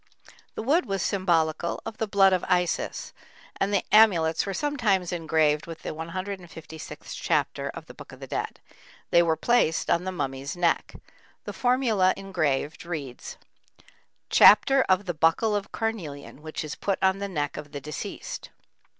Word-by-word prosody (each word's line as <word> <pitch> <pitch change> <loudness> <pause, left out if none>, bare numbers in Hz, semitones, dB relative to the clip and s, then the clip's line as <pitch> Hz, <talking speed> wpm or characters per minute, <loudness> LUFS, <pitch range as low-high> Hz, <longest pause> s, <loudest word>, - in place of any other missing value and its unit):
The - - -4
wood 310 +9 +2
was 195 -2 -1
symbolical 170 -3 0
of 220 - -7
the 220 - -1
blood 195 -2 +4
of 185 - +1
Isis, 180 -2 -1 0.4
and 195 - 0
the 200 - +1
amulets 185 -7 +4
were 195 - -2
sometimes 225 - 0
engraved 160 -3 +1
with 165 -1 -9
the - - -4
156th 165 -1 -7
chapter - - 0
of - - -8
the - - -12
Book - - -12
of - - -13
the - - -7
Dead; - - -4 0.5
they 170 - +6
were 165 -2 +2
placed 235 -10 +2
on 170 - +2
the 185 - -3
mummy's 135 -3 -4
neck. 170 -2 0 0.5
The - - -6
formula 240 -7 +2
engraved 160 -7 -2
reads: 150 -8 -6 0.9
Chapter 270 +6 +7
of 185 +2 +3
the 175 - -2
buckle 165 +7 +2
of 205 -1 -3
carnelian 160 -11 -5
which 155 0 -5
is 150 -2 -5
put 195 -2 -2
on 190 +1 +3
the 200 0 -4
neck 145 -5 -2
of 150 -1 -8
the 145 - -5
deceased. 150 +2 -7
180 Hz, 160 wpm, -26 LUFS, 160-200 Hz, 0.9 s, Chapter